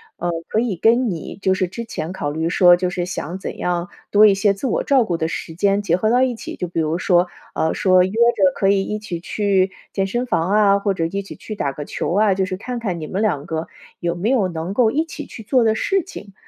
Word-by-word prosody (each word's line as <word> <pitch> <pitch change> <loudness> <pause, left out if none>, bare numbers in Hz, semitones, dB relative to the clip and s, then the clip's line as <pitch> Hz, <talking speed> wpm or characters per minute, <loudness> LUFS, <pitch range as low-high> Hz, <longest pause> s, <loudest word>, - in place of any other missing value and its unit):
呃， 175 - -3 0.2
可 220 - +1
以 225 -7 -2
跟 235 +6 +3
你 170 -2 -6
就 190 - +2
是 185 -1 0
之 195 +6 -6
前 180 -6 -5
考 145 -6 -3
虑 160 +2 -2
说 175 +1 +6
就 180 0 -1
是 180 -1 -3
想 180 0 -5
怎 190 - -6
样 175 +1 -2 0.2
多 210 +1 +7
一 205 - +6
些 195 +1 +2
自 195 - -6
我 255 - 0
照 270 -3 +3
顾 175 -6 -2
的 160 -1 -1
时 165 0 -5
间 200 +4 +1
结 175 -4 +1
合 215 +4 +1
到 245 +2 +3
一 255 -1 +1
起。 - - -8
就 180 - -4
比 170 - -3
如 160 +1 0
说 180 -1 +3 0.3
呃， 160 - 0
说 185 -1 +4
约 - - -3
着 235 +5 +3
可 195 - +2
以 195 -1 +3
一 210 - -3
起 200 -5 -6
去 195 +1 +1 0.2
健 195 -1 -1
身 240 +5 -2
房 185 -7 0
啊， 200 -1 +4
或 200 -1 0
者 165 - -2
一 195 +4 -2
起 195 - -10
去 215 - -8
打 140 -10 -2
个 145 - -6
球 155 - -3
啊。 205 +1 +3
就 190 0 0
是 185 - -4
看 245 +5 -5
看 195 -7 -3
你 155 - -5
们 190 +5 -2
两 175 -10 0
个 160 0 -4 0.3
有 170 0 -1
没 185 +6 -1
有 240 -8 +2
能 170 +1 -4
够 230 +1 +3
一 295 +8 +1
起 330 - -8
去 - - -10
做 250 +3 +2
的 220 -1 +3
事 390 - 0
情， 205 - -11
195 Hz, 285 characters per minute, -20 LUFS, 175-220 Hz, 0.3 s, 多